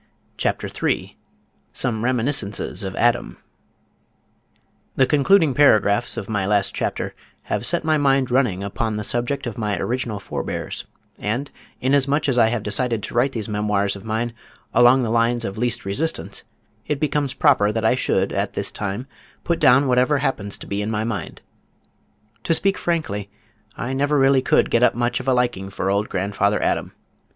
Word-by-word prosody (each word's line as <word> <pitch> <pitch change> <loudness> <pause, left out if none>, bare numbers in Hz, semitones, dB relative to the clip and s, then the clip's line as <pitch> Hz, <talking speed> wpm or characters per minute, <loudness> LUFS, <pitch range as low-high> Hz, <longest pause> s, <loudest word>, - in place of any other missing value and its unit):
CHAPTER - - -1
III - - -1 0.6
SOME 110 -2 -2
REMINISCENCES 120 -5 -1
OF 95 0 -4
ADAM 120 - +1 1.6
The 130 - +4
concluding 155 +2 +4
paragraphs 120 -5 +3
of 100 - -4
my 105 -3 -1
last 100 -1 +1
chapter - - -3 0.3
have - - -2
set - - 0
my 155 -1 +2
mind 135 -3 +2
running 120 -8 +1
upon 110 +2 -2
the 105 - -3
subject 120 +6 -1
of 120 -2 -5
my 105 -3 -1
original 120 -1 -2
forebears, 100 - -5 0.3
and 120 +7 -2 0.3
inasmuch 140 +3 +2
as 125 -3 +2
I 115 - +6
have 110 -2 -1
decided 115 +1 -1
to - - -6
write 130 +3 +2
these 110 -3 -3
memoirs 105 -1 0
of 100 - -10
mine 115 +2 -2 0.4
along 120 +2 +6
the 110 - -1
lines 115 0 +1
of 100 +2 -5
least 120 -2 -1
resistance, 150 +12 -3 0.4
it 150 -2 -1
becomes 145 -3 -1
proper 130 -9 +4
that 110 0 -2
I 110 - +5
should 130 - 0
at - - -1
this - - -2
time, 100 +4 -4 0.4
put 170 - 0
down 130 +3 +5
whatever 125 +3 +3
happens 110 -8 -2
to - - -10
be 100 +1 -3
in 105 - -2
my 110 -1 -1
mind. 110 -6 -4 1.0
To 165 - +3
speak 195 +4 +2
frankly 105 - -2 0.5
I 130 - -3
never 145 +2 +1
really 135 -1 +4
could - - +2
get 115 - +3
up 125 - +4
much 120 0 0
of - - -8
a 130 - +4
liking 120 -6 0
for 95 0 -2
old 100 +1 0
grandfather 100 +2 0
Adam. - - -1
120 Hz, 170 wpm, -22 LUFS, 105-135 Hz, 1.6 s, I